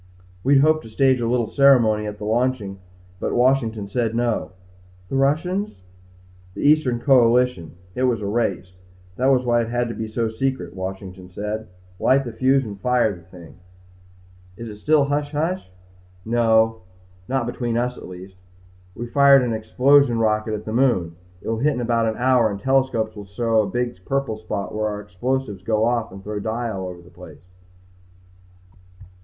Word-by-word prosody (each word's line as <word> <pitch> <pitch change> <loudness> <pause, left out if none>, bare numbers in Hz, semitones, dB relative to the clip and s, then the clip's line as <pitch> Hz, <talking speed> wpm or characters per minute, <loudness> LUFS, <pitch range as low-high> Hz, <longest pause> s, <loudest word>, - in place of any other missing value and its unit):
"We'd 135 +1 +5
hoped 155 +1 +3
to 115 - -12
stage 130 +2 +2
a 115 - 0
little 120 0 +1
ceremony 115 -5 +4
at 105 0 -6
the 105 - -9
launching 110 -3 -1 0.4
but - - -2
Washington 120 -5 +1
said 115 +1 -1
no." 120 -1 0 0.6
"The - - -3
Russians?" 155 - 0 0.7
"The - - -5
Eastern 145 -5 +3
Coalition. 125 - +3 0.2
It 130 +4 0
was 120 -3 +1
a 105 - -5
race. 100 -4 -2 0.4
That 130 - +1
was 130 -2 +3
why 120 -1 +3
it 115 - -4
had 120 0 0
to - - -4
be 110 - -5
so 115 +1 -1
secret. 110 -6 -3
Washington 95 -1 -7
said, 105 +4 -5 0.3
light 135 +1 +3
the 120 - -5
fuse 130 +2 +2
and 100 -2 -8
fire 125 -5 +2
the 85 - -14
thing." 85 -4 -15 1.0
"Is 115 -1 -7
it 105 - -9
still 150 +5 +3
hush 145 +1 -2
hush?" 165 - -2 0.6
"No. 115 -1 +2 0.5
Not 130 -2 -1
between 120 -1 -2
us 125 +1 -1
at - - -10
least. 95 +1 -11 0.6
We 120 - -5
fired 140 +1 +5
an 120 -2 -1
explosion 125 +4 +3
rocket 110 -1 0
at 105 0 -7
the 110 - -4
moon. 115 -10 +1 0.3
It - - -9
will 115 0 -1
hit 150 +4 +2
in - - -3
about 115 -1 +1
an 110 - -1
hour 125 -2 +3
and 100 -1 -5
telescopes 125 -3 0
will 105 -1 -8
show 110 +2 +1
a 100 - -3
big 120 -5 -3
purple 135 -2 -2
spot 105 -2 -5
when 110 0 -2
our 105 -1 -2
explosives 105 +2 -3
go 110 +2 +1
off 120 -1 0
and 95 +1 -11
throw 105 0 -4
dye 115 +2 -3
all 95 -2 -4
over 90 -1 -9
the 90 - -18
place." 85 -2 -14
115 Hz, 180 wpm, -22 LUFS, 105-130 Hz, 1.0 s, We'd